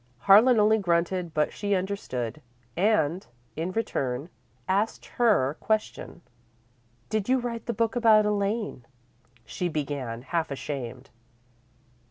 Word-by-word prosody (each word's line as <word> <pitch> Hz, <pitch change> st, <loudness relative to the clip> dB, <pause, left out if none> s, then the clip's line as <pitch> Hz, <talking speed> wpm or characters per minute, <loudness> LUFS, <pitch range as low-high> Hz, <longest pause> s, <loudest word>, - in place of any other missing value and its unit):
Harlan 220 Hz, +4 st, +6 dB
only 215 Hz, +1 st, +4 dB
grunted, 175 Hz, -1 st, 0 dB
but 150 Hz, -1 st, 0 dB
she 205 Hz, -1 st, -1 dB
understood, 155 Hz, -, -3 dB, 0.3 s
and, 185 Hz, -3 st, +1 dB, 0.3 s
in 165 Hz, +4 st, -3 dB
return, 140 Hz, -, -2 dB, 0.4 s
asked 200 Hz, +4 st, 0 dB
her 200 Hz, -, +2 dB
question. 215 Hz, -4 st, -2 dB, 0.9 s
"Did 215 Hz, 0 st, -1 dB
you 260 Hz, -, +4 dB
write 240 Hz, -2 st, -4 dB
the -, -, +1 dB
book 230 Hz, +1 st, 0 dB
about 220 Hz, -3 st, +5 dB
Elaine?" 205 Hz, -, -1 dB, 0.6 s
she 175 Hz, +9 st, -3 dB
began, 140 Hz, -6 st, -4 dB
half 165 Hz, +3 st, -2 dB
ashamed. 135 Hz, -3 st, -6 dB
190 Hz, 115 wpm, -26 LUFS, 150-215 Hz, 0.9 s, Harlan